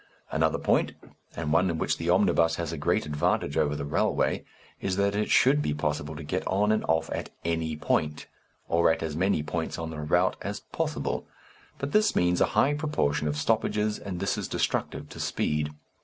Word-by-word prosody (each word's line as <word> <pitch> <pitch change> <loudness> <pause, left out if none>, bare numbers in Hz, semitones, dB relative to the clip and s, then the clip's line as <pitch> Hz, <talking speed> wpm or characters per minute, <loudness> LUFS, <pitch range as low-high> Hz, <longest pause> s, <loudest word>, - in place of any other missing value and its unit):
_ - - -28 0.3
Another - - +2
point - - +1 0.4
and 75 -1 -2
one 90 +3 +4
in 85 - -1
which - - 0
the 85 +1 -2
omnibus 85 -3 +4
has 85 -1 -3
a - - -4
great 70 - +1
advantage 75 -1 0
over 75 0 +2
the 70 - -4
railway 70 - +1 0.4
is 95 - -1
that 100 +1 +2
it 105 +1 -1
should 140 +3 +5
be 75 - -1
possible 75 0 -2
to 70 - -7
get 90 +6 -2
on 105 +3 +2
and 110 - +1
off 80 0 +1
at - - -3 0.2
any 80 -1 -1
point, 75 0 0 0.4
or 85 0 +4
at 80 0 -1
as 80 -2 -3
many 90 -2 +1
points 80 +2 -3
on 80 -1 -4
the 80 - -6
route 75 0 +2
as - - -4
possible. - - -3 0.5
But 140 +1 -4
this 215 0 +3
means 90 0 +2
a - - +7
high 135 +7 +5
proportion 145 - 0
of 75 0 -1
stoppages, 105 +4 +1
and 95 -3 -5
this - - 0
is - - -3
destructive - - -1
to - - -10
speed. 75 0 0
80 Hz, 200 wpm, -27 LUFS, 75-100 Hz, 0.5 s, a